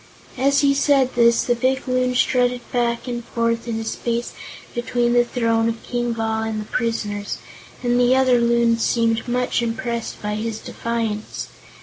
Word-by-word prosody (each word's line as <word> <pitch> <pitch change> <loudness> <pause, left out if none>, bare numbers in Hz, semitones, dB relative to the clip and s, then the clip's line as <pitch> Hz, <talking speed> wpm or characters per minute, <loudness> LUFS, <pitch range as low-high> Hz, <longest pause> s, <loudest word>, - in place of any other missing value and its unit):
As 275 +1 +3
he 280 -1 +4
said 275 -2 +3
this, 235 -1 +4
the 245 - +2
big 260 +2 0
Loon 255 0 +1
strutted 250 -1 +2
back 235 0 0
and 240 -1 -3
forth 230 0 -1
in 230 -1 -2
the 225 - -3
space 235 +1 -3 0.4
between 240 0 0
the 240 0 +5
throne 230 -2 +1
of 230 0 -5
King 240 -1 -2
Bal 220 -1 -1
and 220 -1 -2
the 210 - -5
prisoners, 210 -3 -2 0.5
and 245 0 +2
the 245 +1 +4
other 255 -2 +4
Loons 235 -1 +2
seemed 230 -1 +1
much 245 0 0
impressed 235 0 -3
by 210 0 -3
his 215 +1 -3
defiance. 225 -2 -4
235 Hz, 165 wpm, -21 LUFS, 230-245 Hz, 0.5 s, the